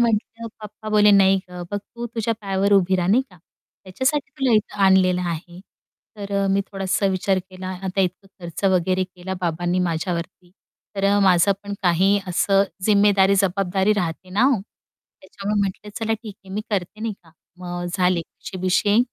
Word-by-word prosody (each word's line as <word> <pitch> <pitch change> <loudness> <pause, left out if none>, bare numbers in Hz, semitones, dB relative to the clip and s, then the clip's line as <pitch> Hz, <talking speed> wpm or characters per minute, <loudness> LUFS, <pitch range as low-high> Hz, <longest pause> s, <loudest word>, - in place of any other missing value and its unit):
म्हटलं 230 0 0
पप्पा 215 +1 -9
बोले, 210 -1 +5
"नाही 195 -1 +5
गं, 180 0 -7
बघ 205 - -1
तू 235 +4 -8
तुझ्या 230 0 -2
पायावर 195 0 0
उभी 190 -1 +4
राहा, 180 0 -1
नाही 240 +6 +4
का? 180 - -18 0.5
त्याच्यासाठी 265 +10 -1
तुला 260 -3 +2
इथं 210 -1 +1
आणलेलं 185 -1 +4
आहे." 175 +2 -6 0.6
तर 200 -1 -7
अ, - - +1
मी 195 +1 +2
थोडासा 195 0 0
विचार 190 0 +1
केला 185 0 -8 0.2
आता 190 +1 -1
इतकं 185 +1 -2
खर्च 170 +2 -7
वगैरे 185 0 +2
केला 185 +1 -7
बाबांनी 175 +1 -1
माझ्यावरती 175 +1 -3 0.5
तर 195 - -1
अ, 200 +1 +4
माझं 190 0 +4
पण 200 0 -5
काही 190 +3 +3
असं 195 +2 +3 0.2
जिम्मेदारी, 200 -2 +4
जबाबदारी 195 +1 +1
राहते 180 -2 -3
ना 205 +6 +1
हो! 260 -6 +3 0.6
त्याच्यामुळे 200 +2 -3
म्हटलं 200 +1 -3
चला 225 0 -1
ठीक 220 -2 -6
आहे 190 - -11
मी 210 - -1
करते, 200 +1 -3
नाही 225 -1 -2
का? 165 - -20 0.3
मग 175 -1 -5
झाले 180 -2 +2
अशे 185 +3 -10
विषय 205 +4 +2
195 Hz, 175 wpm, -22 LUFS, 180-205 Hz, 0.6 s, बोले